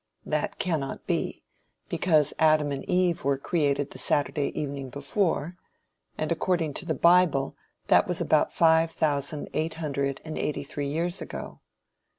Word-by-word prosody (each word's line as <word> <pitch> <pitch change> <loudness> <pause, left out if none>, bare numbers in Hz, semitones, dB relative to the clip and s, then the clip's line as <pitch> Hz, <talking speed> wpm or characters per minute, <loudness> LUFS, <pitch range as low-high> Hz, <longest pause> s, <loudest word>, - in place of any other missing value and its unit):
That - - -2
cannot 155 -7 -2
be, - - -2 0.4
because 155 -5 +2
Adam 155 -2 +4
and 135 -1 -3
Eve 180 -1 +2
were 140 0 +1
created 145 -2 0
the - - -8
Saturday 145 0 +1
evening 140 -2 -4
before, 160 +4 -1 0.6
and 155 +1 -2
according 170 -2 0
to 175 - -11
the 160 - 0
bible 170 -6 +4 0.3
that - - +4
was - - -1
about - - +2
five 160 0 +4
thousand 145 -2 -1
eight 160 +1 -1
hundred 140 -4 -2
and 155 - -5
eighty 150 - -2
three 140 0 -4
years 170 +5 -1
ago. - - -7
155 Hz, 150 wpm, -27 LUFS, 140-165 Hz, 0.6 s, Adam